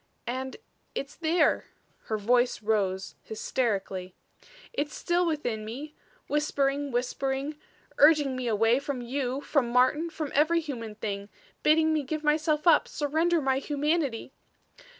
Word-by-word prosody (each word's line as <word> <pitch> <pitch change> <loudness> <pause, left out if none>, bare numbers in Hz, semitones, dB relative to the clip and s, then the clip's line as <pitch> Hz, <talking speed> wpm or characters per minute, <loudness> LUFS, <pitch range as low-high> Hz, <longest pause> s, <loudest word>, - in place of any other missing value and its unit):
"And 260 +2 -4 0.4
it's 280 +1 -4
there," 335 +1 +2 0.4
her 220 - -1
voice 240 +2 +2
rose, 195 -3 0
hysterically. 195 -5 -2 0.6
"It's 295 -8 -2
still 345 0 +1
within 245 -9 -2
me 270 +8 -7 0.3
whispering, 285 -1 0
whispering; 270 +4 -2 0.4
urging 295 -3 +5
me 255 -1 -3
away 225 +3 +3
from 280 -3 -4
you, 260 +2 -2
from 280 -5 +1
Martin, 260 +7 +3
from 310 -3 -5
every 315 +4 +4
human 235 -9 -6
thing; 200 -1 -4 0.3
bidding 315 +1 +4
me 310 - +1
give 305 +3 -4
myself 300 +1 +1
up, 330 -3 +5
surrender 315 +2 +1
my 265 0 +2
humanity. 290 -3 -1
275 Hz, 130 wpm, -28 LUFS, 240-305 Hz, 0.6 s, urging